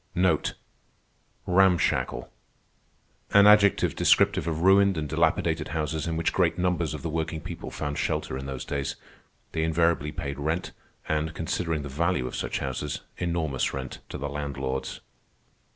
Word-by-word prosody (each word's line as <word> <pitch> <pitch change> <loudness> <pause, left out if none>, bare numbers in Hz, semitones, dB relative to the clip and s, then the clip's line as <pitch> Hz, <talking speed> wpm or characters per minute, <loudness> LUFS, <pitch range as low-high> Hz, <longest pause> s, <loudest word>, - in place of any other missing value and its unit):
An 90 +1 0 1.7
adjective 105 -1 +5
descriptive - - +3
of 80 -1 -1
ruined 95 0 +5
and 75 -1 -2
dilapidated 80 0 +1
houses 80 0 -2
in 80 -1 -1
which 85 - 0
great 90 -3 +2
numbers 90 -3 0
of 75 - -8
the 85 - -2
working 80 0 -2
people - - -7
found 75 0 -4
shelter - - -1
in 65 +1 -5
those 65 -2 -5
days. 70 -1 -2 0.6
They 80 - -1
invariably 80 -2 +1
paid 70 -1 -5
rent, 80 +5 -2 0.4
and, 80 +1 -1
considering 80 -1 -2
the - - -5
value 85 +1 0
of - - -5
such - - -2
houses, 70 +2 -3 0.2
enormous 80 -8 -1
rent, 65 -2 -6
to - - -5
the 70 - -3
landlords. 70 -2 -4
80 Hz, 140 wpm, -27 LUFS, 70-85 Hz, 1.7 s, adjective